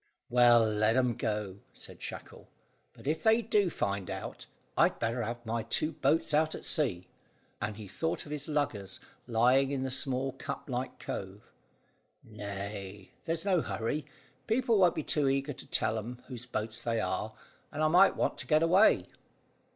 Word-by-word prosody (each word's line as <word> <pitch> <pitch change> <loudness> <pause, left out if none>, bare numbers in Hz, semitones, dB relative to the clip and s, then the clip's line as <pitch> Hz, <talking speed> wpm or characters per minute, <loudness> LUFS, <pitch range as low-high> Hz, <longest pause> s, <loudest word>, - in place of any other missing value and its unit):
"Well, 120 -2 +6
let 110 +1 +2
'em 125 -2 +2
go," 105 -3 -3
said - - -10
Shackle; - - -8 0.4
"but - - -17
if 155 +3 0
they 225 +1 +4
do 210 -3 +2
find 100 - -2
out, - - -6 0.3
I'd - - +3
better 115 +2 -1
have 120 +1 -4
my 115 +1 -1
two 135 +7 0
boats 150 +1 +1
out 155 +1 +2
at - - -9
sea," 95 - 0 0.5
and 105 0 -3
he 105 -2 -8
thought 160 - -2
of 150 - -10
his 145 -2 -3
luggers 145 -11 -2 0.3
lying 125 +3 +4
in 135 -2 -2
the 130 - -3
little 135 0 -1
cup - - -6
like 125 +1 -3
cove. 95 +2 -7 0.7
"Nay 100 -2 -7
there's 165 +2 -2
no 185 -4 +3
hurry; 145 +6 -3 0.4
people 230 -1 +2
won't 180 -2 +5
be 155 - -2
too 145 -2 +2
eager 135 +2 0
to - - -12
tell 110 0 +1
'em 120 +3 -8
whose 125 -2 -8
boats 110 -1 -3
they 115 -1 0
are, - - -2 0.4
and 155 - -2
I - - +5
might 180 +5 +6
want - - -1
to - - -5
get 155 0 +4
away." 185 +6 +5
125 Hz, 175 wpm, -31 LUFS, 110-155 Hz, 0.7 s, Well